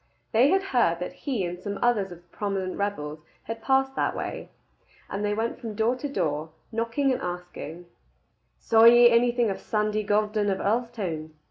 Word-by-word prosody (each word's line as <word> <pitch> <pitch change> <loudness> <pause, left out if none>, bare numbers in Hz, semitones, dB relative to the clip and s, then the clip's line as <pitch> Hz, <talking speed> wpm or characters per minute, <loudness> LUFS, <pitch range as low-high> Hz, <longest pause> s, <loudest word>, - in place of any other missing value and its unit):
They 245 +5 +5
had 385 +2 +3
heard 170 -9 +3
that 180 - -5
he 260 -8 -2
and 175 0 -5
some 200 +2 -4
others 215 -6 +1
of 175 0 -11
the 175 - -28
prominent 195 -3 -2
rebels 155 -7 -3 0.2
had 225 0 -6
passed 265 +1 +2
that - - 0
way; - - -5 0.6
and 200 +1 -3
they 205 0 0
went 225 +2 -2
from 225 -3 -6
door 225 +4 +2
to 290 +2 -4
door, 155 - -1 0.2
knocking 230 +5 0
and - - -3
asking, 175 -1 -6 0.7
"Saw 225 0 +4
ye 240 +1 +8
anything 240 -1 +3
of 195 - -5
Sandy 215 0 0
Gordon 210 0 +1
of 190 - 0
Earlstoun?" 200 -9 -2
210 Hz, 175 wpm, -26 LUFS, 185-240 Hz, 0.7 s, ye